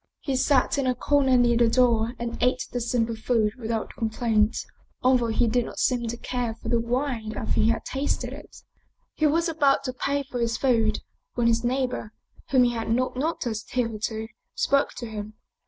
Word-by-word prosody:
He 275 -3 -2
sat 265 +1 +2
in 270 - 0
a 255 - +1
corner 265 0 +3
near 240 -1 +4
the 235 -1 +4
door 235 -1 +3
and 235 -1 -4
ate 250 +1 +2
the 245 - -2
simple 230 -1 0
food 220 -1 +1
without 225 -1 -3
complaint, 220 -1 +1 0.5
al 255 +1 +5
though 240 -2 +1
he 230 +2 +2
did 240 +2 +2
not - - -9
seem 245 -2 +1
to 235 +1 -4
care 240 -2 -3
for - - -7
the 235 - +3
wine 235 -2 -2
after - - -3
he 220 - +3
had 230 - -1
tasted 275 +2 -2
it. - - -12 0.5
He 310 - +2
was 330 +4 +2
about 290 -4 +2
to 255 - -3
pay 280 +2 -1
for 255 -2 -6
his 230 -1 0
food 225 -5 +2 0.3
when 240 - +1
his 230 0 +3
neighbor, 250 -3 -1 0.4
whom 260 -2 +5
he 245 - +3
had 225 -2 -4
not 255 +3 +1
noticed 250 -6 -3
hitherto, 220 -2 -2 0.3
spoke 280 0 +2
to 240 - -6
him. 215 -1 -7
240 Hz, 195 wpm, -25 LUFS, 225-255 Hz, 0.5 s, al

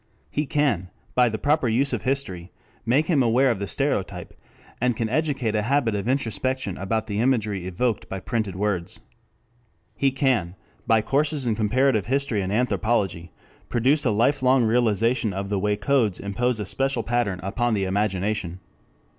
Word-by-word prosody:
He 150 0 -1
can, 130 - 0 0.2
by 125 -1 +4
the 110 - -3
proper 145 +2 +1
use 130 +4 +1
of 115 - -1
history, 110 -9 -2 0.4
make 135 +7 +3
him 155 -5 +2
aware 125 +2 +3
of 110 - -3
the 100 - -3
stereotype, 95 - -2 0.5
and 125 -1 +2
can 115 - 0
educate 135 -3 0
a 105 - +1
habit 125 0 +1
of 100 +1 -3
introspection 130 -3 -1
about 110 +3 -1
the 105 -2 -3
imagery 110 -7 0
evoked 110 +5 -1
by 95 - -4
printed 105 -1 -2
words. 95 -3 -2 1.0
He 140 - +2
can, 130 -10 0 0.3
by 110 -1 +4
courses 145 +2 0
in 115 - +1
comparative 110 +1 +1
history 135 -5 0
and 95 0 -3
anthropology, 105 -7 0 0.4
produce 135 +6 +2
a 125 - +2
life 115 +7 +2
long 130 0 +4
realization 115 -1 +1
of 100 +1 -4
the 100 -1 0
way 105 +1 +1
codes 110 -4 +1
impose 115 +4 -1
a 105 - -3
special 135 +3 -1
pattern 115 -6 -1
upon 120 +4 0
the 100 - 0
imagination. 95 -2 -1
115 Hz, 165 wpm, -24 LUFS, 100-130 Hz, 1.0 s, by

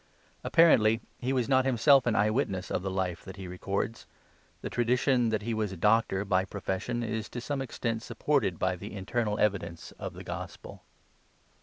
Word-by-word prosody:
Apparently 115 -10 +5 0.2
he 125 - -1
was 125 -3 +1
not 130 -1 +4
himself 135 +1 +4
an 115 - +2
eye 105 -1 +3
witness 100 -7 -1
of - - 0
the 95 - -3
Life 95 -3 -2
that 95 - -9
he 95 -2 -8
records. 100 +5 -3 0.6
The - - -3
tradition 125 0 +2
that 110 -1 -1
he 115 +1 -2
was 110 -2 -1
a 95 - -7
doctor 105 0 +2
by 95 -1 +2
profession 100 +5 -3
is 110 -1 -3
to 125 - -5
some 135 +3 -3
extent 115 -3 -3
supported - - 0
by 95 0 0
the 105 +4 -8
internal 105 +2 -1
evidence 95 -5 -1
of - - -5
this - - -9
gospel. - - -7
110 Hz, 180 wpm, -29 LUFS, 95-120 Hz, 0.6 s, Apparently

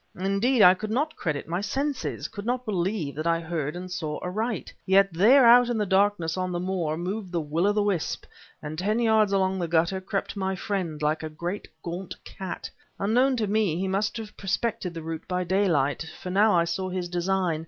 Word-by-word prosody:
Indeed, 200 +6 +2
I 180 - +9
could 215 +3 -5
not 295 +8 0
credit 150 -4 -3
my 175 +3 -2
senses, 275 +5 -2
could 205 - -8
not 245 +2 -1
believe 185 -6 -1
that 155 +2 -3
I 165 0 +2
heard 160 -2 -3
and 180 +1 -7
saw 155 -4 -3
aright. 215 +3 -3
Yet 195 -1 +4
there 240 +10 +6
out 240 +1 +7
in 240 - 0
the 210 - +1
darkness 190 -3 +2
on 185 0 -1
the 175 - -2
moor 175 -4 -1
moved 185 +2 -4
the 175 - 0
will 160 +4 0
o' - - +4
the 210 0 +1
wisp, 195 -6 -1 0.4
and 155 +1 -5
ten 210 +4 +1
yards 220 -3 +3
along 190 -1 +1
the 170 - -1
gutter 170 +3 +1
crept 195 +2 -3
my 190 -1 -1
friend, 180 -6 -3
like 155 +1 +1
a 155 - -4
great 175 +6 -5 0.2
gaunt 175 +2 -5
cat. 190 -1 -6 0.3
Unknown 250 +6 +2
to 220 - +1
me 205 -5 +1
he 190 +2 -1
must 195 +4 -1
have 220 -2 -8
prospected 195 -3 -2
the 165 - -6
route 165 0 -6
by 180 0 -1
daylight, 165 -5 +1
for 180 - -5
now 205 +1 +4
I 170 - +4
saw 170 +3 -2
his 180 -1 -3
design. 175 -1 0
190 Hz, 210 wpm, -26 LUFS, 170-210 Hz, 0.4 s, I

